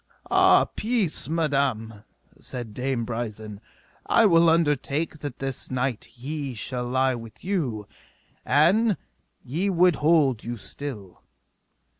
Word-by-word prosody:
Ah, -, -, +6 dB
peace, 210 Hz, -, -1 dB
madam, 140 Hz, -9 st, -1 dB, 0.4 s
said 120 Hz, -4 st, -7 dB
Dame 125 Hz, 0 st, -2 dB
Brisen, 110 Hz, -3 st, -5 dB, 0.5 s
I 230 Hz, -, +5 dB
will 170 Hz, -4 st, +5 dB
undertake 155 Hz, -1 st, 0 dB
that 145 Hz, -4 st, -6 dB
this 135 Hz, -2 st, -4 dB
night 125 Hz, -3 st, -2 dB
he 140 Hz, +1 st, -6 dB
shall 125 Hz, +2 st, -4 dB
lie 130 Hz, +1 st, +2 dB
with 115 Hz, +5 st, -10 dB
you, 130 Hz, -, -2 dB, 0.6 s
an 195 Hz, +8 st, +3 dB, 0.5 s
ye 165 Hz, +10 st, -1 dB
would 180 Hz, -2 st, +3 dB
hold 150 Hz, -7 st, +3 dB
you 120 Hz, +1 st, -5 dB
still. 105 Hz, -6 st, -8 dB
135 Hz, 115 wpm, -25 LUFS, 120-165 Hz, 0.6 s, Ah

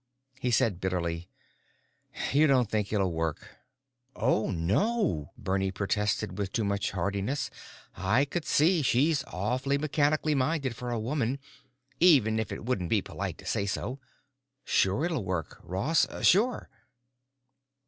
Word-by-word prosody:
He 125 Hz, -, -1 dB
said 110 Hz, -6 st, +2 dB
bitterly, 85 Hz, -2 st, -2 dB, 1.0 s
"You 150 Hz, +2 st, +5 dB
don't 125 Hz, -6 st, +3 dB
think 105 Hz, -2 st, -1 dB
it'll 100 Hz, -4 st, +1 dB
work." 80 Hz, -2 st, -4 dB, 0.6 s
"Oh, 110 Hz, -, +1 dB
no!" 100 Hz, -, 0 dB
Bernie 95 Hz, 0 st, -1 dB
protested 105 Hz, 0 st, -1 dB
with 100 Hz, -2 st, -2 dB
too 115 Hz, -, 0 dB
much 100 Hz, 0 st, 0 dB
heartiness. 100 Hz, +9 st, -2 dB, 0.4 s
"I 105 Hz, +10 st, +2 dB
could 165 Hz, +4 st, -3 dB
see 165 Hz, +4 st, +3 dB
she's 140 Hz, +3 st, +2 dB
awfully 125 Hz, +9 st, -1 dB
mechanically 150 Hz, +1 st, +1 dB
minded 135 Hz, -2 st, 0 dB
for 125 Hz, +2 st, -5 dB
a 120 Hz, -1 st, -1 dB
woman, 125 Hz, +2 st, -1 dB, 0.6 s
even 130 Hz, -11 st, +5 dB
if 110 Hz, -, -3 dB
it -, -, -6 dB
wouldn't 100 Hz, -9 st, -1 dB
be -, -, +2 dB
polite -, -, -5 dB
to -, -, -14 dB
say 100 Hz, -, -1 dB
so. 125 Hz, +6 st, -3 dB, 0.7 s
Sure 100 Hz, -, +2 dB
it'll 160 Hz, -, -1 dB
work, 90 Hz, -3 st, -4 dB
Ross. 120 Hz, -, +1 dB, 0.2 s
Sure!" 225 Hz, +7 st, +3 dB
110 Hz, 135 wpm, -29 LUFS, 95-145 Hz, 1.0 s, You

